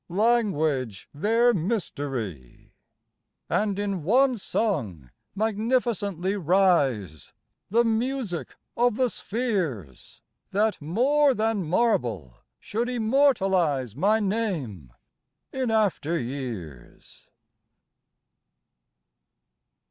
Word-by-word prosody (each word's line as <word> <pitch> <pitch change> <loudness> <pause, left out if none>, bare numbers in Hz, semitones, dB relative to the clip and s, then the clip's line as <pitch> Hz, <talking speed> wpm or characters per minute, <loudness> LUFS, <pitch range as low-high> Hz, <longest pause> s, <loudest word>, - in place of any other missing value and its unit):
Language 170 - 0
their 230 +10 +3
mystery!_ 140 - -4 0.8
_And 205 -2 0
in 200 -3 -2
one 250 - +3
song 125 - -2 0.2
magnificently 210 -3 0
rise, 145 - +1 0.4
The 235 +4 +3
music 230 -5 -2 0.2
of 240 -2 +2
the 250 0 +1
spheres, 180 - -4 0.3
That 210 0 0
more 265 - +2
than 220 -2 0
marble 125 - 0 0.3
should 235 +4 -3
immortalize 195 - +2
My 205 +9 +2
name 175 - -3 0.6
in 260 -2 -1
after 200 -7 +1
years. 115 - -7
195 Hz, 75 wpm, -25 LUFS, 135-230 Hz, 0.8 s, their